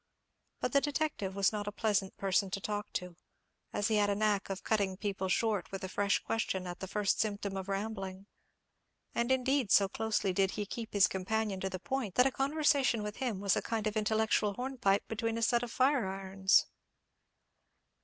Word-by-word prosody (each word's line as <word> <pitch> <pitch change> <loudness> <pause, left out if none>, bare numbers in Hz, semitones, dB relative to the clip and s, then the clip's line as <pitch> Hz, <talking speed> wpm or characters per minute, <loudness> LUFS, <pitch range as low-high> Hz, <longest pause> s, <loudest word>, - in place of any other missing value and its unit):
But - - -1
the 280 - +5
detective 290 -10 -2
was 200 -1 +3
not 205 -1 -3
a - - -1
pleasant 205 -3 0
person 195 0 +1
to 195 - -3
talk 210 +1 -4
to, 180 -2 -4 0.5
as 205 - 0
he 220 -2 +2
had 205 -1 +3
a 200 - +1
knack 205 -1 +1
of 195 -1 -4
cutting 200 -4 0
people 195 -2 -2
short 210 -1 0
with 195 0 -5
a - - -2
fresh 200 +2 +1
question 190 -4 -1
at 175 -1 -6
the 190 - -5
first 205 +1 0
symptom 205 -2 -1
of 190 0 -5
rambling; 195 -1 -4 0.9
and, 235 +2 0
indeed, 260 -3 +1
so 200 - +6
closely 210 -1 -1
did 195 +1 +2
he 210 - -1
keep 225 +2 -6
his 205 -1 +6
companion 200 +1 -1
to 190 - -2
the 185 - -4
point, 255 -2 -3
that 250 - +6
a 270 - +3
conversation 275 -4 +2
with 210 0 -5
him 240 -7 -2
was 200 -1 +2
a - - 0
kind 225 -2 -2
of 215 0 -1
intellectual 215 -1 +1
hornpipe 245 -6 0
between 225 +1 -2
a 230 - -1
set 235 +1 +3
of 245 -1 -5
fire 260 -3 +2
irons. 190 0 +2
205 Hz, 195 wpm, -32 LUFS, 195-230 Hz, 0.9 s, so